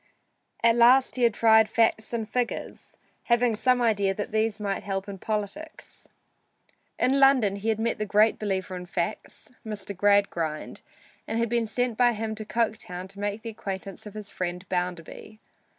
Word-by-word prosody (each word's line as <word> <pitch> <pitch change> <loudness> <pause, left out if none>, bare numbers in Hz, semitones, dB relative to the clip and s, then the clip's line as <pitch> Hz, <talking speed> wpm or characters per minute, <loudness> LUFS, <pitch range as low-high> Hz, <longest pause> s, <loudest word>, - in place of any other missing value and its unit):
At 230 0 +5
last 250 +3 +5
he 255 - -3
had 235 -2 +4
tried 220 -1 +5
facts 225 -1 +1
and 225 -2 -3
figures, 245 0 -4 0.3
having 235 -1 +2
some 250 +2 +2
idea 200 -4 +2
these 215 +1 -1
might 200 -2 -2
help 195 0 -4
in 195 -1 -7
politics. 220 - -5 0.9
In 270 +2 +2
London 255 -8 +4
he 210 +3 -2
had 220 - +1
met 230 0 -1
the 215 - -1
great 210 +2 +3
believer 190 -3 -2
in 180 0 -7
facts, 175 +7 -4
Mr. 205 -2 -6
Gradgrind, 185 -6 0 0.5
and 225 - -2
had 230 0 0
been 235 -1 0
sent 245 +1 -1
by 245 -1 +5
him 220 0 -3
to 215 0 -7
Coketown 210 -5 -2
to 195 +1 -12
make 205 +1 -3
the 230 - -5
acquaintance 195 -1 -7
of 210 - -11
his 210 -1 -8
friend 180 +1 -4
Bounderby. 180 +4 -4
215 Hz, 165 wpm, -26 LUFS, 195-230 Hz, 0.9 s, At